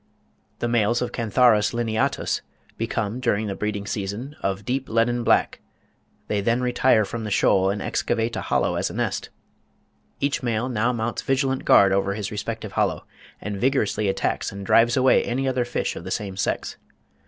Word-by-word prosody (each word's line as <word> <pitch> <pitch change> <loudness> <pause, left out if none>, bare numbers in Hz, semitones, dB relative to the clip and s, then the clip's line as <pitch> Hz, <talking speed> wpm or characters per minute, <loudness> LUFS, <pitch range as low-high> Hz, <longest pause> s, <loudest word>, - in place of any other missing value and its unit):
The 120 - -2
males 120 0 +2
of 125 - -4
Cantharus 115 -1 +3
lineatus 115 -2 0 0.3
become, 115 0 -2
during 110 -4 0
the 100 - -3
breeding 105 0 -3
season, 105 +8 -4
of 100 +1 -2
deep 130 +3 -2
leaden 120 +2 +1
black; - - +2 0.7
they 105 -1 0
then 115 +4 +1
retire 125 -3 +3
from 115 +2 -5
the 105 - -4
shoal, 95 -1 +3
and 100 0 -2
excavate 115 0 -1
a - - -2
hollow - - 0
as - - -1
a - - -8
nest. - - -2 0.9
"Each 140 0 0
male 120 0 -1
now 120 0 +1
mounts 115 -1 -2
vigilant 135 0 0
guard 100 -1 +6
over 100 0 0
his 105 -2 -4
respective 110 0 -5
hollow, - - -1 0.3
and 100 -1 -5
vigorously 120 -5 +1
attacks 95 0 -1
and 100 0 -7
drives 120 +5 +4
away 130 0 +4
any 130 +3 -1
other 130 -2 0
fish 120 - -2
of - - -7
the - - -6
same 100 -2 -3
sex. 100 - -2
115 Hz, 175 wpm, -24 LUFS, 100-120 Hz, 0.9 s, guard